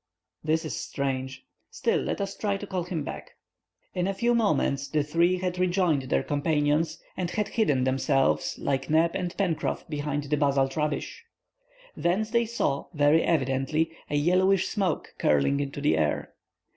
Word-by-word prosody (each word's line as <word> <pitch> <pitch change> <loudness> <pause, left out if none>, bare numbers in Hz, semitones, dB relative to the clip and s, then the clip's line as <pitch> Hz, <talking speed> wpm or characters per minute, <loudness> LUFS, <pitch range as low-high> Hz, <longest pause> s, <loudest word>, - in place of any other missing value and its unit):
"That 160 +1 +1
is 155 - -3
strange. 130 -1 -3 0.2
Still, - - 0
let - - -3
us 195 0 -3
try 200 -2 -1
to 205 - -7
call 185 -3 -3
him 170 -4 -3
back." - - -7 0.6
In 180 0 0
a 195 - -1
few 235 +4 +2
moments 170 - +1
the 150 -2 0
three 170 +5 +2
had 180 0 -3
rejoined 175 -7 +1
their - - +2
companions, 150 +2 +1 0.2
and 180 -2 -2
had 210 +3 -1
hidden 145 - +1
themselves, 135 +1 +1
like 135 -1 -2
Neb 160 +2 +4
and 175 0 -3
Pencroff, 180 -6 -1
behind 145 -1 -2
the 145 +1 -1
basalt 135 -2 +2
rubbish. 150 -2 -2 0.7
Thence 205 +6 0
they 235 -1 +2
saw, 140 -11 -1
very 145 +2 +4
evidently, 150 +1 +1 0.2
a 145 - -1
yellowish 185 +5 +3
smoke 190 -6 -1
curling 75 - +2
into 140 0 -3
the 145 - +2
air. 75 -2 -1
155 Hz, 160 wpm, -27 LUFS, 140-185 Hz, 0.7 s, Neb